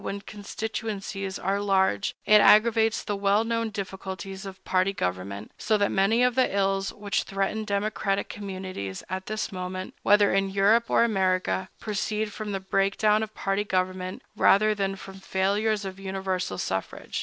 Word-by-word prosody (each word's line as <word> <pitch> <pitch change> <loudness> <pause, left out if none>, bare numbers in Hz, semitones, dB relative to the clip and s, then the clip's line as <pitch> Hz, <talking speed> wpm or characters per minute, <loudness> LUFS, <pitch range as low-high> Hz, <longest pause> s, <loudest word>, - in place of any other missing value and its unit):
When 200 0 -4
constituencies 205 -2 -5
are 195 +2 -1
large, 190 - +1
it 210 0 +7
aggravates 225 0 +5
the 205 - -2
well 200 +2 +2
known 230 0 -1
difficulties 190 -1 -6
of 190 0 -11
party 185 +1 +2
government; 100 - -4
so 215 0 +2
that 205 -1 +1
many 220 +5 +3
of 250 0 +3
the 260 +1 +3
ills 195 0 +1
which 205 0 -1
threaten 195 +2 -2
democratic 200 -1 -1
communities 185 - -6
at 190 0 -4
this 215 0 -3
moment, 185 0 -5
whether 205 0 +4
in 195 0 +2
Europe 205 +4 +3
or - - +4
America, 190 -3 +1
proceed 210 0 -2
from 215 -1 -5
the 195 - -2
break 195 +1 0
down 215 0 +3
of 215 -1 -5
party 195 +1 0
government 185 -1 -2
rather 215 +2 +5
than 195 -2 -1
from 195 0 -11
failures 200 +3 0
of 190 0 -6
universal 190 - -3
suffrage. 95 +1 -3
195 Hz, 160 wpm, -26 LUFS, 190-210 Hz, -, it